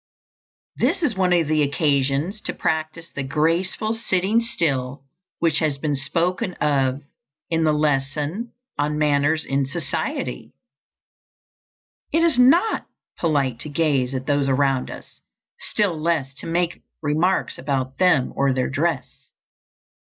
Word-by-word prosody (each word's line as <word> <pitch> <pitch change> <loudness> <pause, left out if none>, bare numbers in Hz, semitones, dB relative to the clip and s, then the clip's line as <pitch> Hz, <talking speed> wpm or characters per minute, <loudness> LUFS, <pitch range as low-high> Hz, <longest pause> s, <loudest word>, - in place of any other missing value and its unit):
This - - +1
is 250 -9 +1
one 185 -1 +2
of 170 -3 +3
the 155 0 +2
occasions 140 +5 +1
to - - -1
practise 160 +1 -2
the 145 - -4
graceful 165 +10 0
sitting 215 -1 +1
still 140 - -2 0.3
which 165 -2 +2
has 150 -3 0
been 145 +1 -1
spoken 170 +6 -1
of 140 -2 +1 0.5
in 165 0 +2
the 155 - +4
lesson 150 - -1 0.3
on 150 +1 0
manners 150 +1 +2
in 135 +1 0
society. 135 - -3 1.6
It 325 +1 +3
is 330 -7 +3
not 335 - +4 0.3
polite 140 -7 +1
to 150 - -5
gaze 140 -4 +1
at 130 0 -3
those 145 -1 +1
around 135 -1 +1
us, - - -11 0.4
still 205 -5 0
less 155 -4 -1
to - - -5
make 175 +1 -1 0.2
remarks 160 +6 +1
about 130 -2 -2
them 180 -8 +3
or 140 -1 +2
their 130 0 0
dress. 150 0 -2
150 Hz, 130 wpm, -22 LUFS, 140-175 Hz, 1.6 s, the